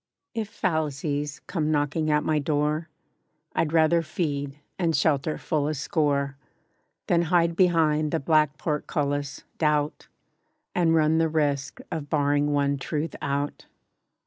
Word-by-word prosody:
IF 220 -2 -3
fallacies, 150 -6 -2
come 155 -5 -1
knocking 150 +1 0
at 150 0 +2
my 155 -1 +1
door, 150 +2 0 0.6
I'd 150 - 0
rather 165 +1 +4
feed, 145 -4 -3 0.2
and 165 -3 +1
shelter 155 0 +1
full 150 -2 -1
a 155 - -1
score, 140 -2 0 0.7
Than 170 - +3
hide 170 -2 +3
behind 160 -4 +3
the 165 - 0
black 150 -1 +2
portcullis, 145 -2 -2 0.2
doubt, 150 -1 0 0.7
And 165 -2 +3
run 160 0 +3
the 165 0 +2
risk 145 -3 -1
of 145 -3 -4
barring 145 0 +2
one 140 -1 +1
Truth 155 +3 -3
out. 140 +1 -2
150 Hz, 130 wpm, -26 LUFS, 145-160 Hz, 0.7 s, rather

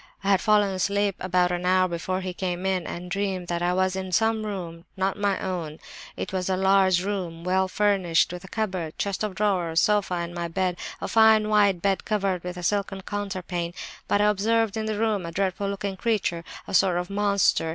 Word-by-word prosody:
I 195 - 0
had 195 - +4
fallen 210 -3 +3
asleep 200 +1 0
about 180 -1 +1
an 175 0 -2
hour 185 0 +3
before 185 +2 -3
he 185 -1 -4
came 180 0 -3
in, 190 -2 0
and 180 +1 -6
dreamed 190 -2 -2
that 170 0 -1
I 175 0 +1
was 185 0 +1
in 190 -1 -4
some 220 +2 +1
room, 170 -4 -6
not 190 +1 0
my 205 -2 0
own. 170 -5 -4 0.4
It - - -5
was 185 0 -1
a 185 - +1
large 190 -1 +4
room, 180 -5 -4
well 190 +1 +1
furnished, 190 -5 +2
with 180 +1 -7
a - - -10
cupboard, 185 -7 -3
chest 200 0 -2
of 210 -3 -3
drawers, 180 -6 +1
sofa, 205 -3 +2
and 170 0 -4
my 170 -1 -3
bed, 180 +1 -1 0.2
a - - -2
fine 220 -1 +5
wide 205 -4 +3
bed 195 -1 +1
covered 195 -4 -1
with 180 0 -5
a 180 - -6
silken 195 +1 -1
counterpane. 185 -4 -4 0.3
But 205 - +2
I - - +4
observed 220 +1 +1
in 220 0 -2
the 215 -1 -2
room 215 -3 0
a 170 - -5
dreadful 195 +2 -1
looking 200 -1 -4
creature, 195 -7 -1 0.2
a - - -7
sort 185 -2 +4
of 180 +2 -3
monster. 200 -5 +2
190 Hz, 210 wpm, -25 LUFS, 180-205 Hz, 0.4 s, fine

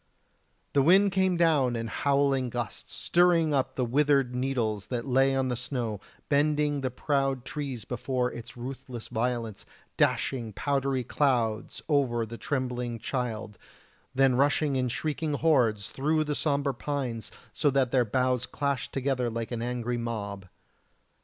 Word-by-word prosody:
The 140 - +4
wind 190 +7 +5
came 190 -2 +2
down 150 -8 +3
in 115 0 -2
howling 140 +1 +1
gusts, 120 -3 -5
stirring 170 -3 +3
up 135 -2 0
the 125 - 0
withered 135 0 +2
needles 120 -6 -1
that 120 -1 -3
lay 135 +1 +3
on 130 -1 +1
the 125 - 0
snow, 120 -4 -3 0.3
bending 145 0 +2
the 130 - 0
proud 135 -1 -1
trees 135 -7 -5
before 125 +1 -1
its 120 +2 -9
ruthless 125 -1 -7
violence, 115 -2 -2 0.3
dashing 120 -5 +1
powdery 135 +2 0
clouds 120 -5 0
over 130 -6 +2
the 115 +1 -9
trembling 125 -3 -2
child; 115 -3 -4 0.6
then 135 -1 +4
rushing 145 +2 +2
in 130 -1 +1
shrieking 150 +4 -2
hordes 125 -10 +2
through 155 +3 +1
the 150 -1 -2
sombre 140 -2 0
pines 125 -3 -3 0.2
so 150 - +2
that 135 -3 +2
their 130 -2 +4
boughs 125 +2 0
clashed 140 -4 -2
together 130 -2 0
like 115 0 -4
an 115 -1 -3
angry 120 0 -2
mob. 100 -5 -4
130 Hz, 145 wpm, -28 LUFS, 120-140 Hz, 0.6 s, wind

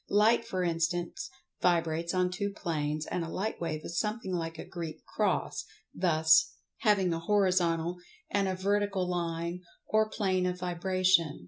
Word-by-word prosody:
Light 220 +3 +4
for 185 -1 -1
instance, 170 0 -1 0.3
vibrates 170 -1 +1
on 180 -1 +1
two 200 +2 -2
planes, 155 -6 -2
and 175 - -2
a 165 - -5
light 205 +4 -3
wave 155 -2 -2
is 170 - -2
something 210 -2 -2
like 165 -2 -3
a - - -7
Greek 165 -3 -7
cross, - - -1 0.3
thus 160 -3 +4
( - - -45
| - - -56
), - - -57
having 195 -5 +3
a 165 - -2
horizontal 175 -3 +2 0.3
and 200 -1 +1
a 190 - 0
vertical 195 -1 0
line, 170 0 -2 0.3
or 215 0 +2
plane 185 -4 +1
of 180 0 -2
vibration. 180 - +2
180 Hz, 165 wpm, -30 LUFS, 165-190 Hz, 0.3 s, Light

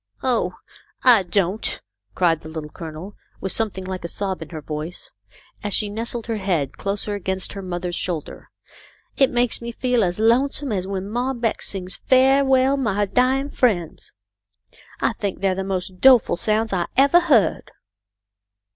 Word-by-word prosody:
" - - -35
Oh, 230 -8 +1 0.5
I 240 -5 +7
don't," 190 +2 0 0.4
cried 165 -3 +2
the 155 - -10
Little 155 -1 -7
Colonel, 165 +3 -8 0.3
with 190 - -2
some 225 -1 +1
thing 190 -1 -8
like 185 -1 -5
a - - -3
sob 190 0 -3
in 160 - -7
her 160 - -6
voice, 155 +3 -6 0.5
as 205 -2 -2
she 210 - 0
nestled 230 +2 -3
her 230 -2 -2
head 175 -9 -1
closer 200 +1 -3
against 190 -2 -3
her 200 - -6
mother's 180 -1 -4
shoulder. 170 -3 -4 0.3
" - - -29
It 270 - +4
makes 240 -1 +1
me 235 0 -5
feel 245 -1 +1
as 180 +1 -1
lonesome 260 +4 +2
as 190 -3 -2
when 195 0 -4
Mom 245 +4 -2
Beck 230 -2 -1
sings 185 -2 -3
' - - -38
Fa' 265 +1 +5
well, 265 +1 +3
my 210 -6 0
dyin' 260 +6 +1
friends.' 185 -10 0 0.9
I - - +1
think 200 -2 -4
they're 195 -1 +2
the 190 +1 -3
most 185 -1 -4
doleful 255 -2 +6
sounds 215 +3 +1
I 175 -2 0
evah 280 +6 +6
heard." 245 - +2
200 Hz, 175 wpm, -22 LUFS, 180-240 Hz, 0.9 s, I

